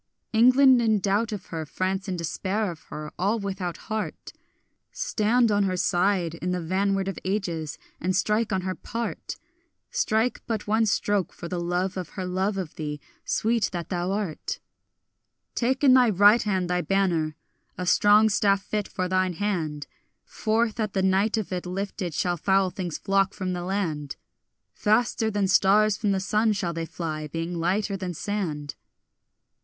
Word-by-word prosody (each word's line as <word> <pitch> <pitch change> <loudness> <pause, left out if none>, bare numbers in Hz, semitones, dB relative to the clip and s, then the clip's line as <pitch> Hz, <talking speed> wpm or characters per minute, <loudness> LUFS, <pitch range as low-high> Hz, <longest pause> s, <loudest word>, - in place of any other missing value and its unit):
England 255 +2 +6
in 220 -2 +3
doubt 205 +4 0
of 205 -4 -5
her, 160 -1 -2
France 190 +5 -2
in 185 -2 -2
despair 190 +5 -2
of 165 - -12
her, 150 0 -7
all 200 +5 +2
without 195 -4 -4
heart— 215 -1 -5 0.6
Stand 240 - +1
on 205 -1 +3
her 185 -1 -1
side 180 -2 +1
in 170 +2 -4
the 180 0 0
vanward 195 +3 0
of 195 - -4
ages, 175 -6 -2 0.2
and 185 +2 0
strike 210 +3 +1
on 190 -1 +1
her 185 0 -2
part! 230 +4 -5 0.6
Strike 220 +2 +1
but 220 -3 -2
one 220 +1 +2
stroke 205 -2 +1
for 170 - -8
the 180 0 -3
love 180 +2 -1
of 180 -3 -4
her 185 - -2
love 190 +3 -1
of 180 -5 -5
thee, 150 -2 -4 0.3
sweet 225 -1 +1
that 170 -2 -4
thou 180 +1 -1
art! 195 -6 -3 1.0
Take 260 +3 0
in 265 -3 +7
thy 250 -2 +6
right 205 +3 +6
hand 190 -4 0
thy 180 0 0
banner, 175 -6 +1 0.4
a 180 - -3
strong 205 +4 +5
staff 200 -1 +2
fit 210 0 -2
for 185 - -2
thine 185 0 +1
hand; 160 -6 -2 0.4
Forth 225 0 0
at 215 -2 -1
the 190 - +1
light 195 +4 +2
of 215 -3 -3
it 180 0 -3
lifted 185 -2 -4
shall 175 -1 0
foul 190 +2 +2
things 175 -4 -4
flock 195 0 +1
from 185 -1 -2
the 175 - -3
land; 165 -7 -2 0.6
Faster 220 +1 +1
than 205 -2 0
stars 205 +2 +4
from 205 -1 0
the 195 - +1
sun 215 +3 +2
shall 180 -4 -2
they 165 0 -4
fly, 155 -3 -4
being 165 +3 -4
lighter 195 +4 0
than 185 -2 -4
sand. 155 -8 -3
195 Hz, 170 wpm, -26 LUFS, 180-210 Hz, 1.0 s, in